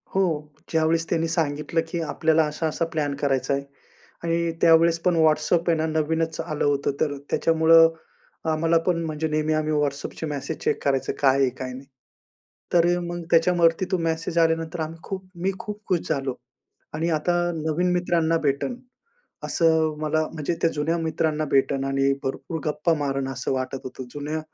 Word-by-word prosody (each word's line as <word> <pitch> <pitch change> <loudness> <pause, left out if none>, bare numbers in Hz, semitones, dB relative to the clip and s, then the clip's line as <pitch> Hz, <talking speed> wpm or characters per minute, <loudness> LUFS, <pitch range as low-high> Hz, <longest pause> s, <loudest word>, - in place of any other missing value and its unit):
हो, 195 - +4 0.5
ज्यावेळेस 160 0 +2
त्यांनी 165 -1 +1
सांगितलं 160 0 0
की 170 +1 -3
आपल्याला 160 0 +2
असा-असा 155 +2 -2
प्लॅन 145 -2 -1
करायचा 135 -2 0
आहे 140 0 -1 0.6
आणि 170 0 0
त्यावेळेस 165 0 +5
पण 180 - +3
व्हॉट्सॲप 160 +2 +2
आहे 165 - +3
ना, 160 - 0
नवीनच 160 +1 -1
आलं 155 -2 -3
होतं, 145 -1 +1
तर 145 -2 0
त्याच्यामुळं 165 0 +5 0.6
आम्हाला 165 +1 +2
पण, 170 -2 +1
म्हणजे 155 0 -2
नेहमी 155 0 0
आम्ही 155 0 0
व्हॉट्सॲपचे 145 +1 -2
मेसेज 150 +2 -4
चेक - - 0
करायचो, 135 -2 0
काय 135 -1 +4
आहे? 135 -2 +4
काय 130 0 -7
नाही? 130 +2 -9 0.9
तर 175 0 +4
मग 175 0 -5
त्याच्यावरती 170 +1 +4
तो 185 - +2
मेसेज 165 +1 -1
आल्यानंतर 165 0 +1
आम्ही 160 +1 -4
खूप 190 -1 -6 0.2
मी 195 - +2
खूप 210 0 -6
खुश 180 -3 +2
झालो 135 -3 -1 0.6
आणि 160 +2 -1
आता 155 +3 +1 0.2
नवीन 160 +3 0
मित्रांना 170 -2 +1
भेटेन. 145 - -1 0.7
असं 160 -2 +2
मला 155 0 +1
म्हणजे 160 +2 -2
त्या 165 - +4
जुन्या 155 +3 0
मित्रांना 160 -1 0
भेटेन 135 0 +2
आणि 135 0 +2
भरपूर 155 +4 -4
गप्पा 150 +2 +1
मारेल 135 -2 -1
असं 130 +1 -3
वाटत 130 0 -2
होतं. 130 0 -7
जुन्या 150 +2 -3
160 Hz, 160 wpm, -24 LUFS, 145-165 Hz, 0.9 s, त्यावेळेस